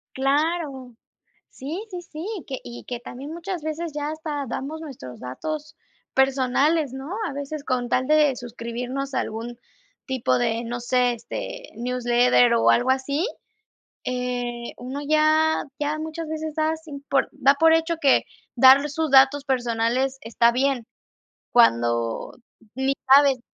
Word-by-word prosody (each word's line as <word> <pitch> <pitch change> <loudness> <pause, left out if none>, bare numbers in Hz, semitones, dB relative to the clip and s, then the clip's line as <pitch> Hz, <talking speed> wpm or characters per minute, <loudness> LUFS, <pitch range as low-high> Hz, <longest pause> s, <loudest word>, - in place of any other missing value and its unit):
Claro, 275 -2 -1 0.6
sí 320 +10 -6
sí 360 -4 -7
sí, 325 0 -8 0.2
que, 265 -2 -4
y 240 0 -9
que 245 - -3
también 260 +5 -8
muchas 340 0 -5
veces 315 +1 -4
ya 295 0 -2
hasta 310 -2 -4
damos 285 +6 -5
nuestros 255 - -9
datos 305 - -6 0.4
personales, 270 +3 +2
¿no?, 270 +6 -7 0.2
a - - -5
veces 285 +1 -5
con 250 -3 -1
tal 255 +2 0
de 305 -3 +4
suscribirnos 245 +3 -5
a - - +2
algún 230 +2 -5 0.5
tipo 245 - 0
de, 225 - 0
no 240 +1 -4
sé, 245 0 +2
este, - - -7
newsletter 245 0 +3
o 230 - +4
algo 245 +2 +3
así, 280 +5 0 0.8
eh, 245 -1 -3
uno 260 +3 -6
ya 310 +1 +3 0.2
ya 295 +1 -1
muchas 315 +1 -5
veces 315 0 -4
das 315 0 -1
sin 285 -3 -9
por 275 - +2
da 275 -1 +4
por 320 +3 +5
hecho 325 +1 +2
que 280 -5 +4 0.3
dar 265 +3 +7
sus 315 +1 -2
datos 270 +1 +6
personales 250 0 0
está 235 +1 +2
bien, 255 -2 0 0.6
cuando 120 - +2 0.4
ni 265 +1 +1 0.2
sabes 275 -2 +6
a - - -23
270 Hz, 145 wpm, -24 LUFS, 245-310 Hz, 0.8 s, dar